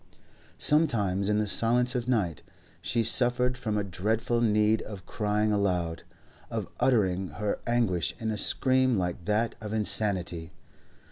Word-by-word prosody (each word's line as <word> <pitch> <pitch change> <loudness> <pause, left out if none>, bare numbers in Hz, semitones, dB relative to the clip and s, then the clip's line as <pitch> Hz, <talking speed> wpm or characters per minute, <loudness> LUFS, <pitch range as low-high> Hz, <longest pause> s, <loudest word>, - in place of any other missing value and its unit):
Sometimes 105 - +1
in 105 - +2
the 105 - +1
silence 120 +4 +2
of 125 -2 -2
night 100 -10 0 0.4
she 115 0 0
suffered 125 +2 +3
from 110 -4 -2
a 105 - 0
dreadful 110 +5 -1
need 105 -1 +3
of 100 -4 -9
crying 105 0 0
aloud, 90 -5 0 0.5
of - - -3
uttering 95 -7 +2
her 100 +7 -3
anguish 110 -10 +1
in 110 -2 -3
a - - -2
scream 130 +1 +2
like 90 -2 -3
that 110 +4 +1
of 105 0 -5
insanity. 100 -6 -1
105 Hz, 140 wpm, -28 LUFS, 95-120 Hz, 0.5 s, suffered